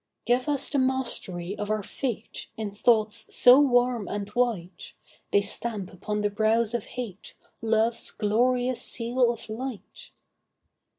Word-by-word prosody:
Give 250 +4 +1
us 280 -2 0
the 285 - +1
mastery 235 -9 -1
of 210 - -3
our 215 -1 -1
fate 230 0 -5
In 215 -2 -4
thoughts 220 0 +2
so 250 +2 +8
warm 245 -5 +2
and 205 -1 -4
white, 215 -6 -2 0.4
They 200 - +4
stamp 200 -1 -2
upon 210 +3 -3
the 205 - +1
brows 220 +2 +1
of 235 -3 -2
hate 225 -7 -8 0.3
Love's 225 +1 +1
glorious 245 +3 +1
seal 240 +1 +1
of 230 -1 -8
light. 230 +1 -7
230 Hz, 135 wpm, -26 LUFS, 210-245 Hz, 0.4 s, so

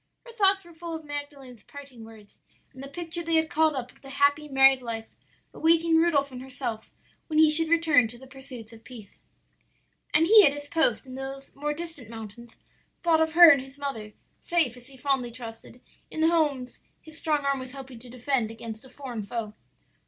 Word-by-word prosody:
Her 475 - -11
thoughts 390 -4 +4
were 340 - -15
full 335 0 -7
of 320 -1 -9
Magdalen's 285 -5 -7
parting 275 -4 -13
words 220 -2 -16 0.3
and 260 - -11
the 275 - -7
picture 335 +4 -6
they 330 -1 +2
had 320 +1 +2
called 315 -2 +2
up 255 -2 -5
of - - -26
the 270 - -12
happy 285 +2 +1
married 270 -1 +5
life 225 -2 -5 0.5
awaiting 330 0 +3
Rudolph 315 -4 +2
and 250 -1 -8
herself 250 -4 -6 0.4
when 310 - -2
he 310 -1 +6
should 320 +1 +3
return 325 -7 +4
to 240 +2 -12
the 265 - -14
pursuits 260 -4 -11
of 225 0 -15
peace. 225 -6 -13 0.9
"And 315 +2 +4
he 425 +3 +8
at 280 - +4
his 290 0 -8
post 290 -8 +2
in 260 - -11
those 270 +1 -8
more 295 +1 -3
distant 325 -8 -7
mountains, 225 +1 -10 0.5
thought 330 -2 +3
of 320 0 0
her 340 -1 +10
and 275 -2 +3
his 270 +1 -13
mother; 225 -7 -6 0.3
safe, 330 -9 0
as 245 0 -15
he 270 -1 -15
fondly 265 -2 -1
trusted, 230 0 -11 0.3
in 315 - -5
the 320 - +4
homes 290 -7 0 0.2
his 315 0 -11
strong 300 -3 -1
arm 275 -1 0
was 255 0 -8
helping 265 -3 -10
to 245 +1 -13
defend 250 -1 -1
against 225 0 -8
a 260 - -15
foreign 250 -4 -7
foe. 215 +1 -5
275 Hz, 205 wpm, -26 LUFS, 245-315 Hz, 0.9 s, her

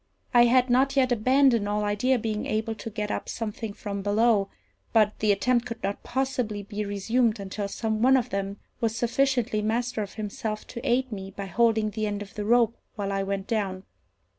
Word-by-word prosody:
I 240 -1 +7
had 250 +1 +4
not 270 +2 +3
yet 260 -2 +3
abandoned 245 -2 +3
all 210 0 0
idea 210 +6 +2
of 240 - -3
being 215 -1 -2
able 220 +1 -1
to 225 - -7
get 210 -1 -3
up - - -3
something 225 -1 -4
from 200 -1 -5
below; 205 0 +2 0.4
but 215 -2 +3
the 210 -1 +3
attempt 240 +4 +1
could 230 -1 -7
not 200 +1 -2
possibly 250 -5 -2
be 210 +1 -4
resumed 220 +3 +1
until 200 +1 -4
some 220 +1 -2
one 265 +2 +6
of 245 - -2
them 195 0 -2 0.2
was 225 -2 0
sufficiently 245 -2 +1
master 230 +2 -1
of 200 - -6
himself 215 0 -4
to 235 - -6
aid 260 -1 +1
me 195 -2 -5
by 200 0 -6
holding 220 +2 +2
the 215 0 -2
end 205 0 -3
of 200 - -15
the 210 - -4
rope 235 0 +4 0.2
while 200 -2 -3
I 195 0 0
went 195 0 -2
down. 195 -4 -2
220 Hz, 200 wpm, -26 LUFS, 205-240 Hz, 0.4 s, I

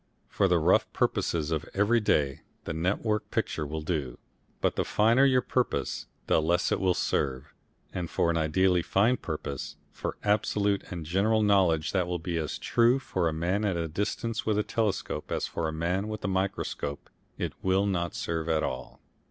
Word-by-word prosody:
For - - +2
the - - +3
rough - - +3
purposes 80 -2 0
of 80 -2 0
every 105 +4 +3
day 75 -10 +1 0.2
the - - -4
net 90 +5 0
work 105 -2 -1
picture 75 - -1
will 80 +1 -4
do, 75 -7 -2 0.4
but - - +1
the - - +1
finer 115 +6 +4
your 130 -2 +4
purpose 125 -1 -1 0.2
the - - +3
less 85 +3 +1
it - - +1
will 95 -2 +2
serve, 65 0 -1 0.4
and 90 -3 -3
for 85 - +1
an - - -1
ideally 90 +3 +2
fine 105 +8 +3
purpose, 75 -2 -5 0.2
for - - -5
absolute 105 -1 +1
and 85 -3 -5
general 105 +6 +2
knowledge 95 -7 +3
that 90 -3 +1
will 90 0 -1
be 85 0 -3
as 75 -3 -3
true 120 +2 +3
for 95 -10 -1
a - - -3
man 90 +6 0
at 95 -4 0
a 85 -1 -1
distance 105 +6 -2
with 110 -2 +1
a 105 - +2
telescope 105 -9 -2
as - - 0
for 80 - -2
a - - -2
man 90 +6 -1
with 110 -1 -5
a - - +1
microscope 95 -6 -2 0.3
it - - -3
will 95 +1 +2
not 85 -4 -1
serve 80 -1 -2
at 80 -1 +2
all. 65 0 -5
90 Hz, 190 wpm, -28 LUFS, 80-105 Hz, 0.4 s, finer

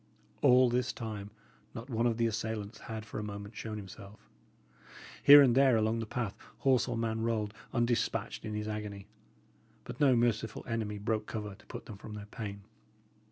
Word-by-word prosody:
All 130 -2 +6
this 120 -1 0
time 105 -3 -6 0.5
not 115 +2 -6
one 120 -2 +1
of 115 -2 0
the 115 - +2
assailants 110 -1 -3
had 110 -1 -6
for 110 - -6
a - - -4
moment 100 +1 -7
shown 110 0 -5
himself. 100 +1 -11 0.9
Here 145 0 +10
and 125 -3 +4
there 130 -2 +5
along 110 +1 +1
the 115 - -4
path, 115 -4 -2 0.2
horse 130 -3 +3
or 120 -2 -2
man 110 -1 -1
rolled, 110 -2 -1 0.2
undespatched, 120 -2 0
in 110 -1 -4
his 105 0 -3
agony; 105 -2 -5 0.8
but - - -8
no 135 -4 +5
merciful 115 -2 0
enemy 110 -3 -2
broke 110 +1 -1
cover 105 -2 -4
to 95 - -18
put - - -8
them 105 - -9
from 105 +1 -8
their 105 -1 -7
pain. 100 -1 -6
110 Hz, 180 wpm, -32 LUFS, 105-120 Hz, 0.9 s, Here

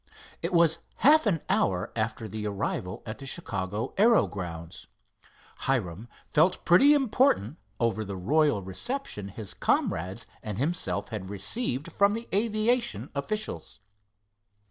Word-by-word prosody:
It 170 - -2
was 170 -2 +4 0.3
half 305 -2 +7
an 165 -7 +1
hour 95 +2 +1
after 110 0 -2
the 110 -1 -4
arrival 100 -1 -3
at 110 -1 -6
the 135 - -8
Chicago 105 - -3
aero 230 +2 +6
grounds. 85 -4 -7 0.7
Hiram 110 -5 -1 0.2
felt 160 +5 +2
pretty 275 +13 +7
important 240 - +2 0.2
over 115 -2 +1
the 100 -2 -6
royal 145 - +2
reception 105 - -4
his 100 0 -7
comrades 95 +7 0 0.2
and 105 -3 -5
himself 160 +8 -1
had 105 -5 -5
received 135 - -2
from 200 +4 +3
the 230 +1 -6
aviation 230 +3 +1
officials. 210 - -4
125 Hz, 125 wpm, -28 LUFS, -, 0.7 s, half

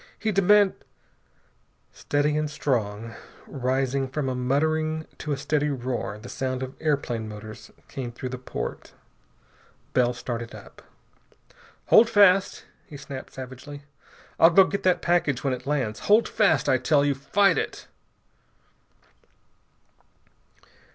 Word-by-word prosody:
He 220 - -1
deman 200 +1 +4 0.6
" - - -41
Steady 145 +1 0
and 150 0 -1
strong, 115 -6 -2 0.3
rising 135 +1 -1
from 135 0 -3
a - - -1
muttering 155 +5 0
to 150 - -4
a 140 - 0
steady 145 +2 0
roar, 120 -6 -3
the 110 +3 -11
sound 130 0 -3
of 130 0 -6
airplane 130 -8 -1
motors 105 +1 -10 0.2
came 125 -3 -6
through 125 +2 -6
the 125 0 -6
port. 125 - -6 1.0
Bell 125 -1 +2
started 120 -2 -5
up. - - -14 1.1
"Hold 225 +1 +7
fast," 200 -3 +4 0.2
he 145 - -10
snapped 140 -1 -9
savagely. 130 +2 -9 0.6
"I'll 165 - +8
go 190 +3 +7
get 200 +1 -3
that 185 -1 +1
package 170 -7 +1
when 135 -2 0
it 125 +1 -7
lands. 130 -7 -1
Hold 215 +3 +3
fast, 195 -10 +2
I 130 - +3
tell 140 +3 +2
you! 145 - +2
Fight 185 +9 +2
it!" - - -5
140 Hz, 130 wpm, -25 LUFS, 125-155 Hz, 1.1 s, I'll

